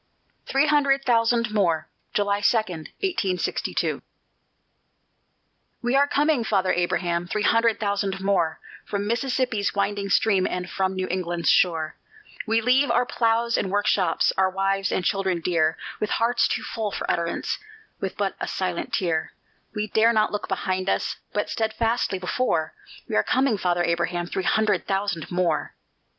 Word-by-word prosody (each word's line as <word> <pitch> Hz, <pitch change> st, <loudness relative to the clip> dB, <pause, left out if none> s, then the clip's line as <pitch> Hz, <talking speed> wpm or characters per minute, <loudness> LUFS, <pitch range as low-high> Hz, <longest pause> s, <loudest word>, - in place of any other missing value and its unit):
THREE 275 Hz, +2 st, +3 dB
HUNDRED 280 Hz, -2 st, +2 dB
THOUSAND 230 Hz, -1 st, +2 dB
MORE 170 Hz, -7 st, +1 dB, 0.3 s
[July 205 Hz, 0 st, +1 dB
2, 225 Hz, -, +4 dB
1862] 190 Hz, -, -2 dB, 1.8 s
We 240 Hz, +2 st, +1 dB
are 280 Hz, +1 st, +5 dB
coming, 290 Hz, -3 st, +2 dB
Father 195 Hz, -4 st, +1 dB
Abraham, 175 Hz, 0 st, 0 dB
three 210 Hz, +3 st, -2 dB
hundred 230 Hz, +1 st, +3 dB
thousand 200 Hz, -2 st, -1 dB
more, 190 Hz, -5 st, +1 dB, 0.2 s
From 200 Hz, 0 st, -3 dB
Mississippi's 245 Hz, -2 st, 0 dB
winding 200 Hz, 0 st, -1 dB
stream 195 Hz, -2 st, +3 dB
and 180 Hz, 0 st, -3 dB
from 190 Hz, 0 st, -1 dB
New 185 Hz, 0 st, -2 dB
England's 175 Hz, -2 st, 0 dB
shore; 160 Hz, -3 st, +2 dB, 0.5 s
We 225 Hz, +1 st, +2 dB
leave 255 Hz, +4 st, +3 dB
our 240 Hz, +1 st, +3 dB
ploughs 230 Hz, 0 st, +1 dB
and 195 Hz, -, -2 dB
workshops, 205 Hz, -1 st, +2 dB
our 190 Hz, 0 st, +4 dB
wives 195 Hz, +1 st, 0 dB
and 180 Hz, -, -1 dB
children 190 Hz, -3 st, 0 dB
dear, 165 Hz, -2 st, +1 dB, 0.2 s
With 210 Hz, -, -1 dB
hearts 235 Hz, +2 st, +2 dB
too -, -, -2 dB
full 220 Hz, -3 st, -3 dB
for -, -, -4 dB
utterance, 170 Hz, 0 st, -2 dB, 0.4 s
with -, -, -4 dB
but -, -, 0 dB
a -, -, -3 dB
silent -, -, -3 dB
tear; 165 Hz, -4 st, -1 dB, 0.4 s
We 210 Hz, 0 st, -1 dB
dare 220 Hz, +2 st, +3 dB
not 215 Hz, -1 st, +2 dB
look 210 Hz, -, -3 dB
behind 185 Hz, 0 st, -1 dB
us, -, -, -1 dB
but -, -, -1 dB
steadfastly 225 Hz, -2 st, 0 dB
before: 180 Hz, -4 st, -1 dB, 0.3 s
We -, -, -3 dB
are -, -, +4 dB
coming, 260 Hz, -3 st, +2 dB
Father 175 Hz, -3 st, 0 dB
Abraham, 175 Hz, +1 st, 0 dB
three 185 Hz, -, -3 dB
hundred 215 Hz, -1 st, +1 dB
thousand 195 Hz, -4 st, -1 dB
more! 175 Hz, -3 st, -1 dB
200 Hz, 150 wpm, -24 LUFS, 180-230 Hz, 1.8 s, are